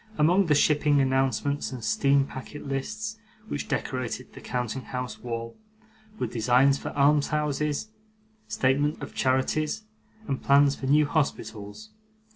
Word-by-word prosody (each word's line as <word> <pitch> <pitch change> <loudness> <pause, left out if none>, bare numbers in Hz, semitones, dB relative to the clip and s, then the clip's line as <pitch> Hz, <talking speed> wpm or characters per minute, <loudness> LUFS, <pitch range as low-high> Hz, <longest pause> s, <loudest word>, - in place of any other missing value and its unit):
Among 175 +5 +4
the 150 - +4
shipping 145 0 +3
announcements 135 +1 +1
and 125 -3 -7
steam 140 +5 +3
packet 140 +2 -9
lists 215 +11 -4 0.3
which 145 - -4
decorated 130 -1 -3
the - - -11
counting 125 +1 -3
house 125 -2 -5
wall, 115 -1 -5 0.6
were - - -1
designs 125 +4 +3
for - - -5
almshouses, 150 +3 +1 0.6
statements 145 +3 +1
of - - -8
charities, 150 +9 0 0.4
and 135 - -2
plans 140 0 +5
for 135 - -5
new 150 +2 +5
hospitals. 145 - -3
140 Hz, 125 wpm, -27 LUFS, 130-150 Hz, 0.6 s, plans